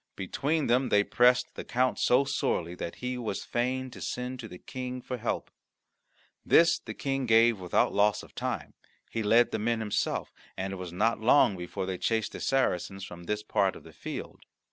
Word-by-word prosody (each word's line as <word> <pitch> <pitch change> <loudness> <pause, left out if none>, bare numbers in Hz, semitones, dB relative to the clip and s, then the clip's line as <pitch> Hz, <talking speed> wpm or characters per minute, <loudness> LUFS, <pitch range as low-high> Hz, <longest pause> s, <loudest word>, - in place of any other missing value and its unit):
Between 145 - -1
them 125 +2 +2
they 105 0 +4
pressed 125 +3 +3
the - - -6
count 125 +1 0
so 125 +3 +4
sorely 120 -11 -1
that 85 -1 -6
he 125 0 -4
was 110 -5 -3
fain 130 +2 -1
to - - -11
send 125 +1 -4
to 115 - -6
the 90 - -10
King 125 +4 -6
for 125 0 -5
help. 120 0 -3 0.9
This 170 0 +5
the - - -8
King 135 -2 -2
gave 115 -1 +5
without 90 -1 +1
loss 105 +1 +2
of - - -15
time; 120 - -4 0.4
he 115 - -2
led 115 +3 +4
the - - -1
men 115 +2 0
himself, 105 -2 -1 0.2
and 95 +1 -3
it - - -5
was 90 -2 -6
not 110 +6 +1
long 115 -3 +5
before 90 +1 -4
they 95 -1 -4
chased 110 -2 0
the - - -7
Saracens 95 -7 0
from 85 -1 -10
this 105 +3 -2
part 100 -3 +1
of - - -12
the 80 - -14
field. - - -7
115 Hz, 195 wpm, -29 LUFS, 95-125 Hz, 0.9 s, This